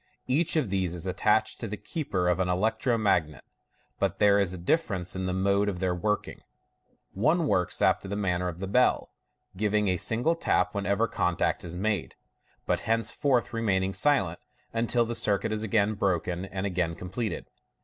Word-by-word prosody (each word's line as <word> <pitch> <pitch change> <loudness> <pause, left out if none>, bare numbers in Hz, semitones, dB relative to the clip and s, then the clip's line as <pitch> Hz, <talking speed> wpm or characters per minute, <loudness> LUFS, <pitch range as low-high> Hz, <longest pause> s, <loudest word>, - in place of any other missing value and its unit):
Each 150 +7 +1
of 145 -11 0
these 95 -3 0
is 85 - -6
attached - - +1
to - - -4
the 105 - -5
keeper 100 - -2
of 90 +1 +2
an 90 -1 0
electro 110 +6 +1
magnet, 85 - 0 0.6
but - - 0
there 100 0 +5
is 100 -3 +2
a 90 - -5
dilference 95 - -1
in 95 0 -2
the - - -1
mode 100 +2 +1
of 95 - -4
their 90 0 0
working. 105 +4 -2 0.7
One 160 - +2
works 90 -10 +1
after - - +2
the 100 - -3
man 95 -4 0
ner 90 - -2
of 90 -1 -5
the 95 - -3
bell, 125 +6 +2 0.4
giving 105 +1 +1
a 90 - +1
single 120 - +1
tap 165 - 0
whenever 100 +2 0
contact - - 0
is 85 -1 -7
made, 100 -1 -2 0.5
but - - -1
thenceforward 120 +2 +1
remaining 95 -4 0
silent 100 - +1 0.3
until 115 +1 +2
the 120 - -3
circuit 110 -3 +1
is 110 0 -2
again 110 -1 +1
broken 90 -2 -1
and 95 0 -4
again 90 -4 -1
completed. 100 +6 -4
100 Hz, 180 wpm, -27 LUFS, 90-115 Hz, 0.7 s, there